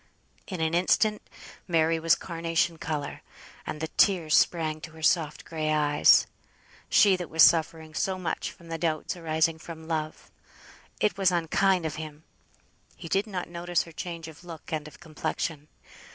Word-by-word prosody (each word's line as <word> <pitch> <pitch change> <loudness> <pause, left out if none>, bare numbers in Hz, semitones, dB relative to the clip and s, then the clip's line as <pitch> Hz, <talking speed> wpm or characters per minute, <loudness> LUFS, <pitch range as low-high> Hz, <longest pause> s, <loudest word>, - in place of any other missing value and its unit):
In 185 -4 -5
an 160 0 0
instant 210 +4 +2 0.5
Mary 165 -1 +2
was 165 0 +4
carnation 165 -1 -1
colour, 145 -2 -4 0.5
and 150 - -4
the 160 - -2
tears 165 -2 +3
sprang 155 -2 +2
to 155 - -9
her 160 -1 -12
soft 155 -2 +1
gray 155 -2 -2
eyes; 150 -1 +5 0.6
she 200 -2 +6
was 165 -2 +3
suffering 160 -1 +3
so 190 +3 -1
much 175 -3 -3
from 170 -1 -16
the 165 0 -4
doubts 155 0 -1
arising 160 -1 0
from 160 -1 -10
love! 155 -1 -4 0.7
It 210 -1 0
was 190 -2 +4
unkind 175 +1 +2
of 155 -1 -3
him. 155 -1 -8 0.7
He - - -9
did 195 +5 +1
not 185 -4 -4
notice 175 0 -1
her 165 - -13
change 165 0 -6
of 160 +2 -13
look 165 -1 -10
and 155 -1 -3
of 155 - -14
complexion. 155 -2 -4
165 Hz, 160 wpm, -27 LUFS, 155-175 Hz, 0.7 s, she